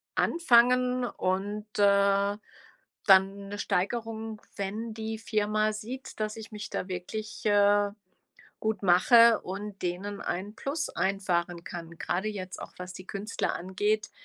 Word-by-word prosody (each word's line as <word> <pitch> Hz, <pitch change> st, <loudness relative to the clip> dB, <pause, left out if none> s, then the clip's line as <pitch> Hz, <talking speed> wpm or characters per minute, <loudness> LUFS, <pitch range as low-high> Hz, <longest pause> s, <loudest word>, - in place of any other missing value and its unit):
anfangen 250 Hz, -4 st, +4 dB
und, 205 Hz, 0 st, -2 dB
äh, 200 Hz, 0 st, +4 dB, 0.7 s
dann 195 Hz, +1 st, +5 dB
'ne 205 Hz, -, -5 dB
Steigerung, 220 Hz, +3 st, -2 dB, 0.2 s
wenn 215 Hz, +3 st, -3 dB
die 220 Hz, 0 st, -4 dB
Firma 215 Hz, 0 st, +1 dB
sieht, 240 Hz, +5 st, -7 dB
dass 215 Hz, 0 st, -2 dB
ich 220 Hz, 0 st, -9 dB
mich 210 Hz, -1 st, -6 dB
da 185 Hz, -, -3 dB
wirklich, 200 Hz, +5 st, -6 dB
äh, 205 Hz, 0 st, +4 dB, 0.7 s
gut 220 Hz, -1 st, -1 dB
mache 225 Hz, +5 st, +6 dB
und 200 Hz, +1 st, -6 dB
denen 190 Hz, +3 st, -3 dB
ein 190 Hz, +4 st, -3 dB
Plus 295 Hz, +6 st, -3 dB
einfahren 175 Hz, -3 st, -1 dB
kann, 170 Hz, -2 st, -7 dB
grade 190 Hz, +4 st, -1 dB
jetzt 185 Hz, -3 st, -6 dB
auch, -, -, -8 dB
was 180 Hz, 0 st, -7 dB
die 185 Hz, -, -10 dB
Künstler 205 Hz, +3 st, -2 dB
angeht. 205 Hz, +4 st, -1 dB
205 Hz, 130 wpm, -29 LUFS, 190-220 Hz, 0.7 s, mache